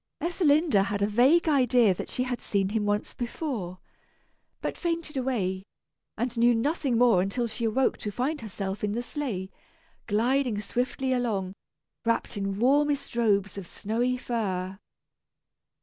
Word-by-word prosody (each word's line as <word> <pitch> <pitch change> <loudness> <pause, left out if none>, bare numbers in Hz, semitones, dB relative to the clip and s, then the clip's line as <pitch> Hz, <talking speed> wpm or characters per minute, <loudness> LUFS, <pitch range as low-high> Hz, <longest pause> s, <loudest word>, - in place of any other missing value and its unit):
Ethelinda 315 - +3
had 200 0 -1
a - - +3
vague 260 +11 +4
idea 250 -7 +4
that - - -6
she 250 - -1
had 250 -1 -3
seen 195 -2 0
him 210 0 -1
once 205 0 -1
before, 240 - -4 0.8
but - - -3
fainted 335 -3 -3
away, 220 -8 -1 0.6
and 240 +2 -2
knew 240 0 +5
nothing 275 0 0
more 230 -6 +5
until 200 +6 -1
she 230 +1 -3
awoke 255 +4 +1
to 210 - -3
find 265 +9 -2
herself 200 -2 -5
in 205 -1 0
the 240 +2 -2
sleigh, 225 -10 -4 0.6
gliding 235 +1 +1
swiftly 250 +4 -1
along, 210 -7 -1 0.5
wrapped 230 0 0
in 195 -1 -2
warmest 280 +3 +2
robes 200 -4 +1
of 185 - -9
snowy 240 +7 -1
fur. 195 -7 -2
235 Hz, 145 wpm, -27 LUFS, 205-265 Hz, 0.8 s, knew